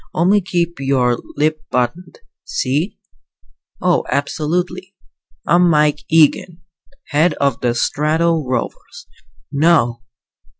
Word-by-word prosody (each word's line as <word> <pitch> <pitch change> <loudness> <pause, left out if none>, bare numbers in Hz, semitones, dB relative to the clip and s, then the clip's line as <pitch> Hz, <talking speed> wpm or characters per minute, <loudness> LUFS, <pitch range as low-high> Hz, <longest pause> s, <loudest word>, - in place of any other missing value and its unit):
Only 190 +5 +3
keep 170 -3 -2
your 130 -3 +1 0.2
lip 155 +1 0
buttoned, 125 - -3 0.2
see?" 145 +9 -2 0.8
"Oh, 180 -1 +1
absolutely." 175 +6 -2 0.5
"I'm 175 +1 +4
Mike 150 -2 +2
Eagen 165 +2 +2 0.5
head 155 +2 +2
of 140 -4 0
the 120 -1 0
Strato 160 +5 +1
Rovers." 480 - -5 0.5
"No!" 140 -6 +2
155 Hz, 95 wpm, -18 LUFS, 140-175 Hz, 0.8 s, I'm